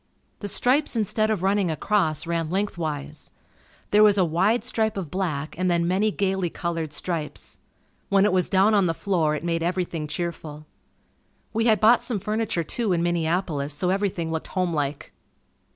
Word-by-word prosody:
The 205 - -5
stripes 260 +7 +2
instead 215 0 +1
of 210 -5 -1
running 195 -1 +2
across, 160 -1 0
ran 165 -1 -2
lengthwise. 160 -6 -3 0.6
There 210 - +5
was 210 -1 +6
a 185 - +4
wide 195 +8 +1
stripe 220 -3 -1
of 175 -6 -5
black 160 -6 -2
and 185 0 +1
then 170 -1 +1
many 195 +4 +2
gaily 190 -3 -1
colored 165 -2 -3
stripes. 160 -1 -4 0.5
When 200 0 +4
it 210 - +2
was 185 -1 +2
down 195 +3 +4
on 200 -3 +4
the 165 - -1
floor, 165 -6 0
it 150 - -5
made 165 -1 -1
everything 175 -2 -2
cheerful. 155 -1 -5 0.9
We 225 +1 +1
had 220 -2 +4
bought 225 +2 +5
some 235 - -1
furniture 215 -3 -1
too 210 +4 -1
in 170 -1 0
Minneapolis 165 -4 -1
so 180 +5 0
everything 190 -4 -1
looked 160 -1 -3
homelike. 155 -6 -2
180 Hz, 170 wpm, -24 LUFS, 165-205 Hz, 0.9 s, was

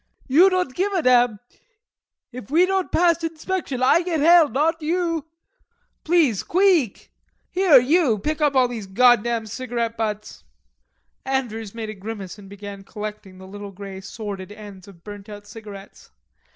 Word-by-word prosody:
"You 325 +8 +6
don't 365 -8 -1
give 385 +8 -1
a 360 -4 0
damn. 245 -4 +3 0.9
If 250 -4 -10
we 335 +5 +4
don't 380 0 -1
pass 335 -1 +2
inspection, 320 -4 -3
I 295 +6 +5
get 340 -3 -2
hell 330 +1 +6
not 320 +6 0
you. 330 -1 -1 0.8
Please 310 - +2
queeck. 355 - +1 0.4
Here, 365 -6 +5
you, 270 -2 +2
pick 305 +9 -3
up 290 -2 +2
all 255 -1 +4
those 225 -5 -7
goddam 235 +1 +3
cigarette 230 0 -4
butts." 215 -1 -4 0.8
Andrews 230 -6 -3
made 220 -2 -5
a - - -7
grimace 200 -1 -8
and 195 -1 -13
began 200 0 -9
collecting 210 -2 -8
the 190 - -12
little 205 +1 -9
grey 195 0 -9
sordid 200 -1 -7
ends 205 -2 -12
of 175 -4 -16
burnt 205 -1 -10
out 205 -1 -10
cigarettes. 205 -2 -12
235 Hz, 150 wpm, -22 LUFS, 205-320 Hz, 0.9 s, You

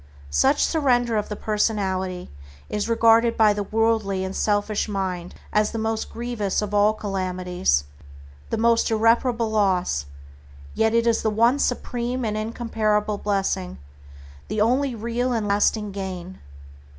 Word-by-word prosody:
Such 70 0 +3
surrender 245 -7 +1
of 210 - -1
the 210 - -3
personality 190 - -1 0.4
is 210 +2 -2
regarded 230 0 +4
by 215 -2 +5
the 205 - -3
worldly 215 -2 0
and 190 0 -5
selfish 210 +1 0
mind 185 -3 -3 0.2
as 210 0 +3
the 230 - -5
most 220 0 -2
grievous 235 -4 -2
of 210 0 -5
all 205 +1 +4
calamities, 180 - -1 0.7
the - - -1
most 230 +1 +3
irreparable 230 +1 +2
loss, 180 - +1 0.7
yet 220 +1 +1
it 230 0 +3
is 230 -1 +2
the 220 - +1
one 235 +6 +3
supreme 245 -1 -2
and 215 -1 -2
incomparable 215 -2 -1
blessing, 195 -2 -1 0.7
the 215 - -3
only 250 +4 +2
real 235 +3 -2
and 220 -3 -1
lasting 205 +1 +1
gain. 190 -2 -6
215 Hz, 140 wpm, -23 LUFS, 195-230 Hz, 0.7 s, by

